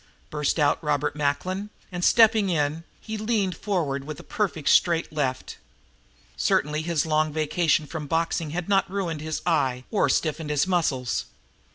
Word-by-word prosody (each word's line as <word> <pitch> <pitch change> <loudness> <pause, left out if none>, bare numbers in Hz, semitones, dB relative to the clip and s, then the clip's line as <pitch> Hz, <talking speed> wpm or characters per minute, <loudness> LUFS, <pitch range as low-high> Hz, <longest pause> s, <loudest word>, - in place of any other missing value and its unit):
burst 150 +1 0
out 150 +1 +2
Robert 145 -2 0
Macklin, 185 +8 -1 0.2
and, 175 -1 -4
stepping 220 -2 +5
in, 155 -1 0 0.2
he 220 0 -6
leaned 210 -5 0
forward 165 -9 -2
with 150 +1 -7
a - - -10
perfect 180 -8 -2
straight 170 -2 +3
left. 130 -4 -2 0.8
Certainly 150 +1 +1
his 165 -2 0
long 155 0 +1
vacation 155 +1 +1
from 150 -1 -6
boxing 165 0 0
had 170 +2 -4
not 195 -2 +2
ruined 180 -6 -3
his 155 0 -4
eye 135 -7 +1
or 210 - +2
stiffened 155 -1 0
his 150 +1 +2
muscles. 150 - 0
160 Hz, 155 wpm, -25 LUFS, 150-180 Hz, 0.8 s, stepping